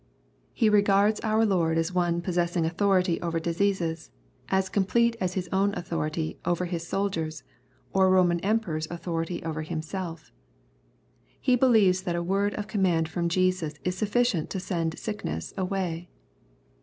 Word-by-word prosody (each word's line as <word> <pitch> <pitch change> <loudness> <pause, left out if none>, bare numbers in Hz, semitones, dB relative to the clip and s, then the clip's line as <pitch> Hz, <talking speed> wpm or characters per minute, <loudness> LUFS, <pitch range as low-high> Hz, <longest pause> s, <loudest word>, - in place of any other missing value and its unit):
He 225 - +2
regards 205 0 +4
our 220 0 +2
Lord 170 -5 +2
as 165 +2 0
one 175 -1 +1
possessing 175 -1 0
anthority 185 0 +2
over 165 -1 -1
diseases^ 170 -1 -1 0.4
as 190 0 +2
complete 230 +5 +2
as 185 -1 -1
his 180 -2 -2
own 200 +1 +2
authority 160 -2 -3
over 175 +1 0
his 170 -1 -3
aoldiers, 160 -7 -2 0.5
or 190 -1 +4
a 185 0 +5
Eoman 175 -1 +1
Emperor's 190 -7 -1
authority 170 0 -3
over 160 -1 -3
himself 165 +1 -5 1.1
He 255 -1 +3
believes 220 -8 +4
that 175 -2 -2
a 170 - -1
word 195 +3 0
of 210 - -3
command 180 -6 +1
from 170 +1 -1
Jesus 185 -3 +1
is 180 0 -1
suf 205 +2 -2
ficient 225 -8 +1
to 190 - -3
send 165 -3 -2
sickness 85 - -4
away. 180 -3 -2
180 Hz, 150 wpm, -27 LUFS, 165-200 Hz, 1.1 s, a